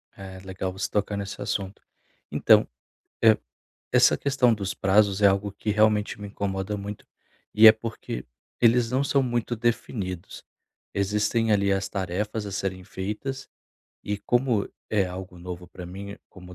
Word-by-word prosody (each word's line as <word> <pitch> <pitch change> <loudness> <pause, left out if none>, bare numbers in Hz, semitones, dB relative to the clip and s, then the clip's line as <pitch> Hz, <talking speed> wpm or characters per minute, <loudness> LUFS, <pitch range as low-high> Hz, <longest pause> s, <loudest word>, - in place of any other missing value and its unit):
É, 95 -1 -9
legal 95 0 -4
você 95 +1 -3
tocar 105 0 -1
nesse 100 0 -5
assunto. 100 0 -3 0.5
Então, - - +5 0.6
eh, 110 -2 +6 0.5
essa - - +5
questão 130 -4 +2
dos 100 -2 -4
prazos 100 +1 +3
é - - +8
algo 100 +1 +2
que 105 +2 -3
realmente 105 0 +2
me 100 - -6
incomoda 100 0 -3
muito, 100 +1 -7 0.5
e 110 +1 +8
é 110 - +12
porque 110 - -6 0.4
eles 115 0 +4
não 130 +2 +1
são 140 0 +2
muito 120 -1 -1
definidos. 105 -6 -3 0.5
Existem, 105 +3 +1
ali, 100 -1 +3
as 95 0 -1
tarefas 105 +3 -3
a 100 - -6
serem 95 -1 -3
feitas 105 +10 -5 0.5
e 105 - -2
como 120 -4 +1 0.2
é 105 -3 +3
algo 90 0 -8
novo 90 0 -7
para 90 - -9
mim 100 +3 -8
como 90 -1 -13
100 Hz, 150 wpm, -26 LUFS, 95-110 Hz, 0.6 s, é